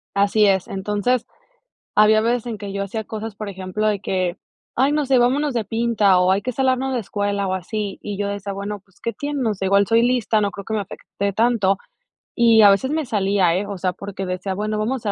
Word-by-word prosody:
así 205 +2 +3
es, 190 -2 +2
entonces, 210 +5 -1 0.7
había 215 +1 +5
veces 235 +1 0
en 225 -3 -4
que 200 -1 -6
yo 200 0 -2
hacía 215 +3 -4
cosas, 220 0 -6
por 210 0 -6
ejemplo, 190 +2 -3
de 210 -2 +1
que, 185 -2 -1 0.4
ay, 270 +3 +3
no 295 -2 0
sé, 265 - +3
vámonos 270 +4 +2
de 230 -2 0
pinta 220 -3 +2
o 180 +1 +3
hay 195 +1 +2
que 255 - -3
salarnos 265 +1 0
la 255 - 0
escuela 205 -1 -2
o 185 - -1
así, 200 +2 -4
y 205 -1 -5
yo 205 -1 -1
decía, 200 0 -4
bueno, 200 +1 -5
pues, 195 -1 -30
qué 230 - -3
tienen, 285 -2 -3
o 215 - +1
sea 195 - -5
igual 200 +1 +4
soy 230 +2 +3
lista, 240 -3 +2
no 200 - +1
creo 200 -1 -9
que 220 - -3
me 215 - 0
afecte 200 +1 -4
tanto, 210 -3 +2 0.6
y 230 -2 +5
a 205 - +8
veces 260 +8 +1
me 310 -1 -1
salía, 195 -6 +1
eh, 200 +3 -2
o 200 -1 -5
sea, 185 0 -1
porque 195 +1 -6
decía, 185 +1 -3
bueno, 210 +2 -2
vamos 215 +5 0
a 225 -5 -4
210 Hz, 235 wpm, -21 LUFS, 195-230 Hz, 0.7 s, a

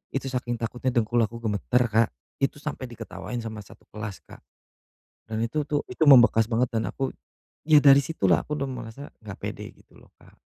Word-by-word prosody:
itu 135 0 -2
saking 120 -1 -2
takutnya 125 +3 -2
dengkul 120 0 +2
aku 115 +1 -11
gemeter, 110 +4 +1
Kak, 110 +1 +3 0.3
itu 135 - 0
sampai 145 -4 -5
diketawain 120 +1 -7
sama 110 -1 -6
satu - - -17
kelas, 105 -2 -7
Kak, - - -14 0.9
dan 110 0 -3
itu 150 +7 -1
tuh, 145 -1 0
itu - - -4
membekas 120 -5 +7
banget, 120 +2 +1
dan 110 - 0
aku 135 -1 -3 0.6
ya, 155 -2 +7
dari 140 -1 +8
situ, 150 -8 -2
lah, - - +4
aku 150 - -3
udah 140 0 -2
ngerasa 125 +1 -7 0.2
enggak 95 -3 -8
pede, - - -5
gitu, - - -22
loh, - - -20
Kak. - - -20
120 Hz, 195 wpm, -26 LUFS, 110-135 Hz, 0.9 s, dari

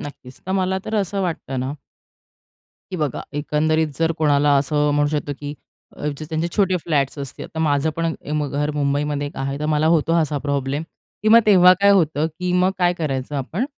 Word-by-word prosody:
नक्कीच 135 -3 -10
तर 190 - -2
मला 190 0 0
तर 220 - -4
असं 195 +1 -2
वाटतं 150 -7 -3
ना 130 +3 -3 1.2
की 185 - -3
बघा 150 -6 -2 0.2
एकंदरीत 155 +2 +1
जर 165 0 +2
कोणाला 145 -1 +3
असं 145 +1 +1
म्हणू 145 0 +2
शकतो, 145 -1 -2
की 145 0 -5 0.6
जे 155 - -6
त्यांचे 160 +1 -1
छोटे 190 -3 +3
फ्लॅट्स 145 -3 0
असतील. 140 -1 -6
तर - - -5
माझं 150 0 +1
पण 165 0 0 0.4
घर 145 +1 -1
मुंबईमध्ये 145 0 -1
एक 145 - -9
आहे. 135 +1 -3
तर 150 - -2
मला 150 +1 +2
होतो 165 +1 +1
असा 150 -2 -1
प्रॉब्लेम 140 0 -2 0.4
किंवा 215 +1 +6
मग 230 - 0
तेव्हा 185 -3 +7
काय 200 - +6
होतं, 160 -6 +3
की 180 +3 -4
मग 180 +1 +3
काय 175 -1 +3
करायचं 145 -4 -3
आपण, 155 - -2
150 Hz, 185 wpm, -21 LUFS, 145-175 Hz, 1.2 s, तेव्हा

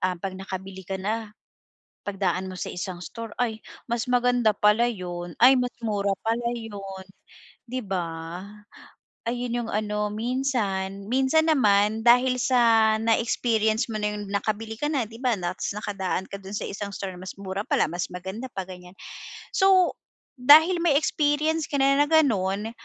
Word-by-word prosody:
ah, 185 0 0
'pag 190 +2 -5
nakabili 190 0 -7
ka 195 - -2
na, 215 +2 -2 0.8
pagdaan 190 -2 -1
mo 185 - -7
sa - - -4
isang 180 0 -5
store, 230 -1 -8
ay 225 -2 -1 0.3
mas 235 0 -1
maganda 245 -2 +3
pala 210 +3 +4
'yun, 175 -5 -6
ay 250 +2 +9
mas 250 -1 -1
mura 200 -2 0
pala 235 +1 0
'yun, 195 -4 -7 0.6
'di 255 +2 -3
ba? 185 -3 -1 1.2
Ayun 240 0 -2
yung - - -6
ano 210 0 -1
minsan, 210 -5 -2
minsan 270 +5 +3
naman 215 -6 +3
dahil 250 +2 +5
sa 230 -4 +4
na-experience 225 0 +1
mo 215 - -4
na 210 - 0
yung 205 -1 -6
nakabili 215 +2 -2
ka 295 - 0
na 270 -6 0
'di 225 - -13
ba 250 - +3
ta's 175 +2 -3
nakadaan 195 -3 -3
ka - - -7
do'n 195 0 -10
sa - - -3
isang 200 0 -5
store 195 -1 -5
na 180 - -11
mas 185 - -6
mura 195 0 -4
pala, - - +2
mas 175 0 -2
maganda 190 +7 -6
pa 190 - -4
ganyan. 180 -1 -11 0.6
So 380 -3 +4 0.5
dahil 320 +7 +7
may 310 -5 +4
experience 305 +1 +1
ka 285 - -1
na 275 +1 +4
na 290 - +3
gano'n, 215 -9 +2
220 Hz, 165 wpm, -25 LUFS, 195-245 Hz, 1.2 s, ay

